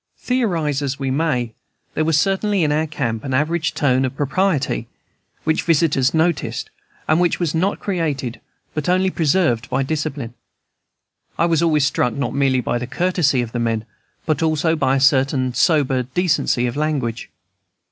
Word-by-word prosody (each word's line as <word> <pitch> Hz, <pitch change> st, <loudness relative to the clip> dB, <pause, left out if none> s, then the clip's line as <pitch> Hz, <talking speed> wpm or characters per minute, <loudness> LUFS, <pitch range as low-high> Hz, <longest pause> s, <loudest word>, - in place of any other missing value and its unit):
Theorize 170 Hz, -, 0 dB
as 140 Hz, -1 st, -2 dB
we 135 Hz, -2 st, -2 dB
may, 130 Hz, -6 st, 0 dB, 0.4 s
there 155 Hz, -, 0 dB
was 155 Hz, -1 st, +2 dB
certainly 195 Hz, +2 st, +1 dB
in 150 Hz, -, +1 dB
our 155 Hz, +2 st, +1 dB
camp 115 Hz, -7 st, -3 dB
an 135 Hz, -2 st, -2 dB
average 155 Hz, +3 st, 0 dB
tone 130 Hz, -3 st, +2 dB
of 130 Hz, 0 st, -2 dB
propriety 145 Hz, -3 st, 0 dB, 0.6 s
which 160 Hz, 0 st, +1 dB
all -, -, -13 dB
visitors 150 Hz, -5 st, +3 dB
noticed, 165 Hz, 0 st, -1 dB, 0.4 s
and 155 Hz, +2 st, +3 dB
which 175 Hz, -2 st, +1 dB
was 170 Hz, -4 st, -1 dB
not 185 Hz, +5 st, 0 dB
created, 150 Hz, -, -2 dB, 0.3 s
but 155 Hz, +1 st, -2 dB
only 185 Hz, +1 st, +2 dB
preserved 145 Hz, -8 st, +1 dB
by 135 Hz, +2 st, 0 dB
discipline. 145 Hz, -4 st, -3 dB, 1.0 s
I 170 Hz, -, +3 dB
was 165 Hz, -2 st, +2 dB
always 155 Hz, -4 st, +3 dB
struck, 125 Hz, -3 st, 0 dB
not 140 Hz, -4 st, -2 dB
merely 135 Hz, -2 st, +2 dB
by 120 Hz, 0 st, -1 dB
the 125 Hz, -, -5 dB
courtesy 155 Hz, -4 st, +1 dB
of 115 Hz, -, -7 dB
the 120 Hz, -, -3 dB
men, 115 Hz, -2 st, -1 dB, 0.4 s
but 155 Hz, -2 st, 0 dB
also 160 Hz, +1 st, +1 dB
by 135 Hz, -4 st, +1 dB
a -, -, +2 dB
certain 135 Hz, -1 st, +2 dB
sober 135 Hz, -1 st, +2 dB
decency 130 Hz, -2 st, 0 dB
of 120 Hz, -, -2 dB
language. 140 Hz, -7 st, -2 dB
145 Hz, 165 wpm, -20 LUFS, 130-165 Hz, 1.0 s, visitors